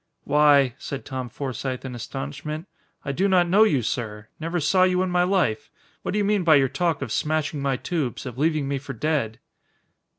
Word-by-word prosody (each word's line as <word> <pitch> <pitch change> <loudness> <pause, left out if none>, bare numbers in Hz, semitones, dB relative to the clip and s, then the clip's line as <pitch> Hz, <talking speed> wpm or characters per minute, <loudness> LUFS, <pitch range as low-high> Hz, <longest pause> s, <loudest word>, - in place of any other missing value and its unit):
"Why," 145 -3 +4
said 140 - -6
Tom 130 -3 -5
Forsythe, 130 0 -4
in 130 - -5
astonishment. 140 - -6 0.4
"I 140 - -1
do 190 +8 +1
not 180 -2 +4
know 195 +5 +4
you, 150 - +4
sir. 105 -2 -4
Never 165 +2 -2
saw 175 +5 +2
you 185 0 +3
in 185 - -2
my 180 0 +3
life. 175 - +1 0.3
What - - -3
do - - 0
you 205 - +2
mean 205 -2 +2
by 160 -2 +6
your 135 -2 +4
talk 165 -2 0
of 120 - -6
smashing 155 +1 -1
my 135 -2 0
tubes, 145 -5 -3
of 125 -3 -6
leaving 155 -2 +1
me 140 0 -1
for 135 0 -7
dead?" 120 -3 -1
145 Hz, 200 wpm, -24 LUFS, 130-175 Hz, 0.4 s, by